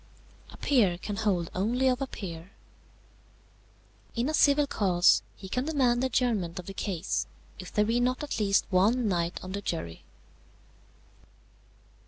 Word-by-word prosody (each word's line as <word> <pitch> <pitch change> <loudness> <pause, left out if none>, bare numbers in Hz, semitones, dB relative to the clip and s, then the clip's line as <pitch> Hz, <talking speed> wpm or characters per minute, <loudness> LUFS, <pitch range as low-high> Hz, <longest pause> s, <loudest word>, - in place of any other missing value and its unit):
"A - - -13
peer 210 -11 +2
can 205 +3 -5
hold 190 -6 0
only 235 +8 +1
of 255 +1 +1
a 270 - -1
peer. 175 -4 -8 1.6
"In 240 +4 0
a - - -2
civil 290 -1 +4
cause 185 -8 +3
he 190 - -10
can 250 +7 -2
demand 260 -6 +2
the 260 - +2
adjournment 220 -9 0
of 180 - -6
the 195 - -7
case, 190 -2 -2 0.3
if 185 - -8
there 210 - +2
be 230 +3 +1
not 255 +3 0
at 290 - -3
least 200 -2 +2
one 215 +6 +3
knight 175 -2 -1
on 185 - -7
the 200 +1 -4
jury. 85 - -5
210 Hz, 155 wpm, -28 LUFS, 185-250 Hz, 1.6 s, civil